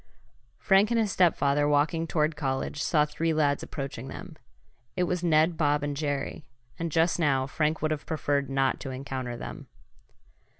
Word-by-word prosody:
Frank 195 +2 +4
and 235 -1 +2
his 215 -3 +1
stepfather, 145 -5 +3
walking 155 +3 +1
toward 155 -1 +1
college, 140 0 -2
saw 150 -3 +3
three 160 +2 -1
lads 145 -2 +2
approaching 135 -3 -6
them. - - -9 0.6
It 180 - +1
was 180 0 -1
Ned, 160 0 +3
Bob 145 -2 +2
and 145 -1 -2
Jerry, 145 0 -3 0.4
and 165 -1 -2
just 165 +3 +2
now 135 -5 +2
Frank 150 +3 -1
would 155 - +1
have 155 - -3
preferred 145 -3 -1
not 135 -1 +1
to 135 - -6
encounter 130 -2 -5
them. - - -8
150 Hz, 165 wpm, -27 LUFS, 140-165 Hz, 0.6 s, Frank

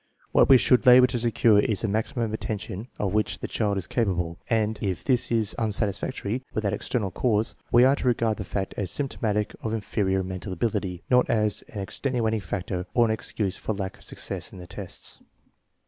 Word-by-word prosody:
What - - +4
we 135 - +9
should 125 +1 +3
labor 125 0 +9
to 125 - -1
secure 115 -2 +4
is 105 -2 +1
the 115 - 0
maximum 110 +2 -1
attention 105 0 -4
of 100 -2 -1
which 105 0 0
the - - -5
child 105 -3 0
is 95 - -2
capable, 90 -7 -1
and 110 -2 +1
if 95 -5 -2
this 125 -3 +1
is 110 -3 +1
unsatisfactory 110 +2 -1
without 105 -2 0
external 105 -1 -2
cause, 110 +2 +1 0.2
we 120 +1 +6
are 135 +2 +5
to - - -2
regard 115 -3 +1
the - - -4
fact 95 0 -3
as 95 -3 -1
symptomatic 105 - -1
of 110 0 -2
inferior 95 -3 0
mental 95 +1 -5
ability, 95 -2 -2
not 125 0 +4
as 105 -2 +1
an 105 - -6
extenuating 110 0 -1
factor 90 0 -4
or 120 - +5
an 110 - +1
excuse 105 -3 -1
for 110 - -3
lack 95 -1 -5
of - - -15
success - - -4
in - - -11
the 90 - -9
tests. - - -7
105 Hz, 195 wpm, -26 LUFS, 95-115 Hz, 0.2 s, we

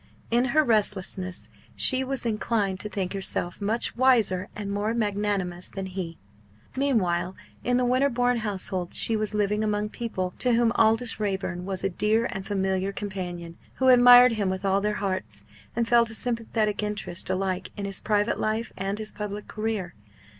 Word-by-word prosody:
In 240 +2 +3
her 310 +3 +3
restlessness 200 -5 0 0.3
she 260 0 +4
was 265 -2 -3
inclined 210 -3 0
to 210 - -5
think 190 -2 -3
herself 190 -1 -3
much 220 +4 -1
wiser 225 -7 +3
and 205 -1 -4
more 210 +3 -1
magnanimous 205 -5 -1
than 195 -1 -5
he. 180 -3 -5 0.6
Meanwhile 190 -10 +1 0.3
in 245 0 +2
the 250 - +2
Winterbourne 245 -1 +2
household 190 -4 -3
she 225 - 0
was 215 0 -1
living 210 +1 +1
among 210 0 0
people 190 -6 -4
to 250 -1 +2
whom 230 0 +3
Aldous 225 +1 +2
Raeburn 190 -3 -2
was 190 -1 -3
a - - +3
dear 215 +5 +1
and 195 0 -6
familiar 190 -1 0
companion, 180 -4 -6 0.2
who 260 0 +3
admired 245 0 +8
him 210 -4 0
with 190 +1 -3
all 195 0 +2
their 210 +1 0
hearts, 185 - -3 0.3
and 235 0 0
felt 235 -1 +4
a 225 - -6
sympathetic 225 -3 0
interest 210 -4 -3
alike 185 -1 -1
in 200 - -3
his 195 -1 +1
private 210 +1 0
life 220 +2 -1
and 195 +2 -3
his 215 0 -5
public 210 0 -5
career. 215 -5 -3
210 Hz, 170 wpm, -26 LUFS, 190-230 Hz, 0.6 s, admired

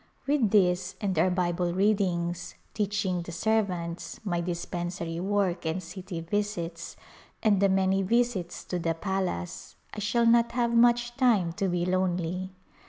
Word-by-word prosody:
With 275 -6 +2
these 185 -3 +2
and 200 -4 -1
our 185 - +4
Bible 175 -1 0
readings, 180 -4 0 0.2
teaching 205 -4 -1
the 170 - -7
serv 220 +4 +1
ants, 170 -1 -5
my 175 -5 -1
dispensary 175 -1 -4
work 190 -2 0
and 160 +2 -1
city 180 0 -7
visits, 170 -2 -3 0.5
and 210 -4 +4
the 200 - +5
A - - -1
Glimpse 190 - +3
of 190 - +3
India - - +1
many - - +2 0.2
visits 185 -8 -6
to 180 - -3
the 165 -1 -1
palace 165 - -3 0.2
I - - -5
shall 235 +3 +1
not 235 0 +4
have 235 -1 +1
much 240 0 +4
time 215 -10 +3
to 195 +2 -1
be 175 -1 0
lonely. 185 0 -1
185 Hz, 170 wpm, -28 LUFS, 175-210 Hz, 0.5 s, the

